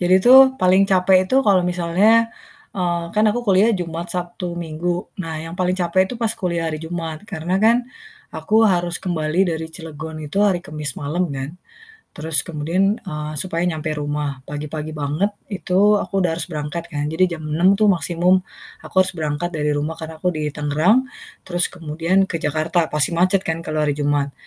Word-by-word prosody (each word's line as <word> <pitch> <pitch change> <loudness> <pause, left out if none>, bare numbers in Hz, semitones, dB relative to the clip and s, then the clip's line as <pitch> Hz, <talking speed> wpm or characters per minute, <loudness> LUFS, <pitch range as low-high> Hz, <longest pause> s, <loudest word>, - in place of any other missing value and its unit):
Jadi 180 +1 +3
tuh 255 +4 +9 0.2
paling 185 +1 +4
capek 185 0 +4
itu 260 - +1
kalau 190 -3 +4
misalnya, 180 +6 +3 0.5
eee, 175 -2 -1
kan 215 +1 +3
aku 240 +3 -2
kuliah 200 +4 +4
Jumat, 170 -3 -3
Sabtu, 175 0 -4
Minggu. 175 +2 -3 0.2
Nah, 160 -2 -5
yang 165 +2 -7
paling 185 0 +1
capek 185 +1 +2
itu - - -4
pas 230 -2 0
kuliah 170 -2 -2
hari 155 -1 -3
Jumat. 160 -1 -5
Karena 180 -1 -3
kan 235 +2 +4 0.5
aku 220 +1 +3
harus 175 -3 0
kembali 175 +1 0
dari 160 0 -5
Cilegon 160 -1 -8
itu 150 +6 -4
hari 195 -4 +3
Kamis 150 -3 -4
malam 165 +4 -2
kan. 135 0 -4 0.7
Terus 160 +1 0
kemudian 175 +6 0
eee, 150 -4 -6
supaya 170 0 -1
nyampe 155 -1 -3
rumah, 145 -2 -3
pagi-pagi 150 +1 -5
banget 150 +8 -1 0.2
itu 195 +2 +3
aku - - -6
udah 175 - +2
harus 170 +2 -3
berangkat 155 +2 -5
kan, 145 -3 -3
jadi 175 +1 +1
jam 155 - -10
6:00 170 +6 +3
tuh 210 -1 +4
maksimum 180 +1 +2 0.4
aku - - -13
harus 190 - 0
berangkat 160 +1 -3
dari 150 -2 -1
rumah 160 +3 -3
karena 160 0 -7
aku 180 +2 -1
di 155 -1 -2
Tangerang, 155 - +2 0.4
terus 175 -1 0
kemudian 170 +3 0
ke 165 -3 -4
Jakarta, 155 +2 0
pasti 150 +2 +2
macet 185 +3 +2
kan 165 0 -2
kalau 155 -2 -2
hari 145 - +1
Jumat. 145 -1 -1
170 Hz, 180 wpm, -20 LUFS, 155-185 Hz, 0.7 s, tuh